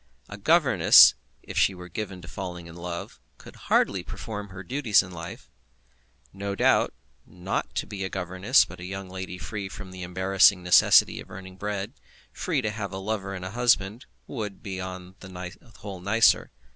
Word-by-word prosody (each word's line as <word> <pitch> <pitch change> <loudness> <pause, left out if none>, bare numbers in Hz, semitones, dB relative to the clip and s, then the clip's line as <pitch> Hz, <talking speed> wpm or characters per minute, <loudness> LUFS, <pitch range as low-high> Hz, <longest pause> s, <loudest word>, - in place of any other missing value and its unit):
A - - -7
governess, 130 - +7 0.3
if - - -3
she 95 - +3
were 90 0 -10
given 95 0 -6
to - - -10
falling 90 -2 -7
in 85 -1 -11
love, 85 0 -7 0.2
could - - -14
hardly - - +2
perform 105 -2 -7
her 95 0 -9
duties 120 -2 +2
in 95 - -11
life. 85 -1 -9 0.9
No 100 0 -4
doubt, - - +2 0.3
not 90 +3 -4
to - - -1
be 100 -2 -6
a 95 - -3
governess, 95 0 +2
but - - -12
a - - -9
young 95 +1 -6
lady 95 -1 -6
free 100 0 -6
from 95 - -9
the 95 0 -9
embarrassing 95 +1 +3
necessity 90 0 +5
of - - -10
earning 95 0 -10
bread, 105 +3 -4 0.4
free 155 -8 -1
to 110 - -1
have 105 -3 -5
a 95 - -5
lover 100 -1 -3
and 90 0 -7
a 95 - -5
husband, 120 0 +1 0.2
would 105 -6 -6
be 95 -2 -5
upon 95 0 -8
the 90 -1 -8 0.3
whole 100 -3 -7
nicer. 110 +4 +3
95 Hz, 180 wpm, -26 LUFS, 90-105 Hz, 0.9 s, governess